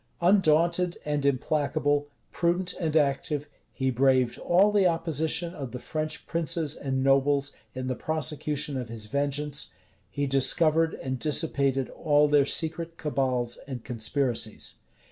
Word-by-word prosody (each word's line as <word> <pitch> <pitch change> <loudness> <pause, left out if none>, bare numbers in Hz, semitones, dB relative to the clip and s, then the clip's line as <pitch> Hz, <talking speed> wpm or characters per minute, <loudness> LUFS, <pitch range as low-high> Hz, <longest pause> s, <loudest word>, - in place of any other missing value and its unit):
Undaunted 175 -1 +3
and 145 -1 0
implacable, 145 +1 0 0.2
prudent 175 +1 0
and 160 -3 +1
active, 145 0 0 0.2
he 130 -1 -1
braved 130 -1 +2
all 195 +4 +3
the 200 -3 +4
opposition 165 0 0
of 135 -8 -7
the - - -3
French 155 +4 -4
princes 165 -2 -1
and 130 -1 -2
nobles 140 +1 +2 0.2
in 130 0 -4
the 130 - -1
prosecution 150 -1 -2
of 125 -3 -5
his 115 -2 -6
vengeance; 145 +3 -2 0.4
he 145 - -2
discovered 155 +4 +3
and 130 -1 -4
dissipated 140 -3 +1
all 150 -2 +3
their 145 -1 +4
secret 165 +2 -2
cabals 130 -5 -1
and 130 -4 -6
conspiracies. 120 -1 -2
145 Hz, 130 wpm, -27 LUFS, 135-160 Hz, 0.4 s, the